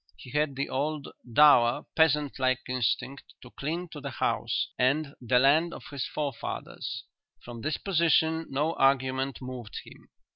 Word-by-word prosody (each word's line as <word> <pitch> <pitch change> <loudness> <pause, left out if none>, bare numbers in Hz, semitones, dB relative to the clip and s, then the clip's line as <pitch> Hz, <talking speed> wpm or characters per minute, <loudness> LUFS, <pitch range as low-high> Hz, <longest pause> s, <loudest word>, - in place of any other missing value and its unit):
He 125 - -12
had 150 -1 0
the 140 +1 -2
old 145 +2 -2 0.2
dour, 120 -3 +5
peasant 150 -3 +2
like 130 -1 +1
instinct 130 +2 -2
to - - -13
cling 165 +5 -4
to - - -9
the - - -4
house - - -1
and 140 +3 +1
the 125 +1 +2
land 150 +6 +4
of - - -10
his 140 -2 -3
forefathers. 140 -5 -5 0.4
From 120 -1 -8
this 155 +4 -1
position 160 -3 +2
no 150 +4 0
argument 135 -1 +1
moved 125 -4 -7
him. - - -16
140 Hz, 150 wpm, -28 LUFS, 130-155 Hz, 0.4 s, dour